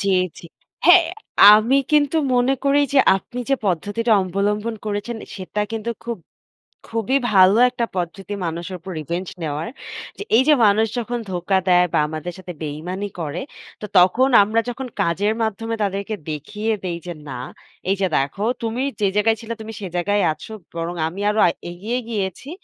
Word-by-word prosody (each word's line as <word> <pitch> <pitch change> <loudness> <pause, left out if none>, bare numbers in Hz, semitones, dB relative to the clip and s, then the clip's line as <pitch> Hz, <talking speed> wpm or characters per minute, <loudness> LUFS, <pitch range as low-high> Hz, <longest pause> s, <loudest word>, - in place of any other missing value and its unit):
জ্বী, 195 -1 +2 0.2
জ্বী। - - -11 0.4
হ্যাঁ, 355 -2 +7 0.5
আমি 230 +6 +4
কিন্তু 295 0 +3 0.2
মনে 250 +2 +3
করি 280 +1 +4
যে, 280 - +5 0.2
আপনি 245 +6 -7
যে, - - +5
পদ্ধতিটা 205 +6 0
অবলম্বন 205 +4 -1
করেছেন, 210 +3 -3 0.2
সেটা 195 +2 -4
কিন্তু 225 +1 -3
খুব 235 -2 -4 0.7
খুবই 230 +4 +1
ভালো 190 +2 +6
একটা 240 -2 -2
পদ্ধতি, 185 +3 -4
মানুষের 170 +3 -4
উপর 190 +3 -9
রিভেঞ্জ 170 +4 -4
নেওয়ার। 155 +1 -3 0.5
যে, - - -5
এই 245 - +6
যে, 305 - +8
মানুষ 210 +2 +4
যখন 240 +1 -2
ধোকা 180 +2 +1
দেয়, 180 0 +5
বা - - +2
আমাদের 155 +3 -5
সাথে 185 -1 -8
বেইমানি 175 +7 -4
করে, 155 - -3 0.4
তো 210 - -5
তখন 190 +9 +5
আমরা 215 +3 +1
যখন 265 +2 -5 0.2
কাজের 200 +6 +1
মাধ্যমে, 225 +1 -2
তাদেরকে 200 +1 -2 0.2
দেখিয়ে 210 +9 -3
দেই 175 -2 -3
যে, 175 - -4 0.2
"না, 125 -2 -5 0.5
এই 195 - +2
যে, 195 - +3
দেখো, 140 +9 -2 0.2
তুমি 230 +3 -2 0.2
যে, 205 - +3
জায়গায় 220 +2 +3
ছিল 230 -1 -11
তুমি 220 0 -7
সেই 190 -3 -5
জায়গায় 205 +4 +1
আছো। 185 - -11 0.2
বরং 170 +1 -3
আমি 180 +5 -8
আরো 215 +1 +1
আ - - +5 0.2
এগিয়ে 210 +8 -3
গিয়েছি। 205 - -4
205 Hz, 170 wpm, -21 LUFS, 180-230 Hz, 0.7 s, যে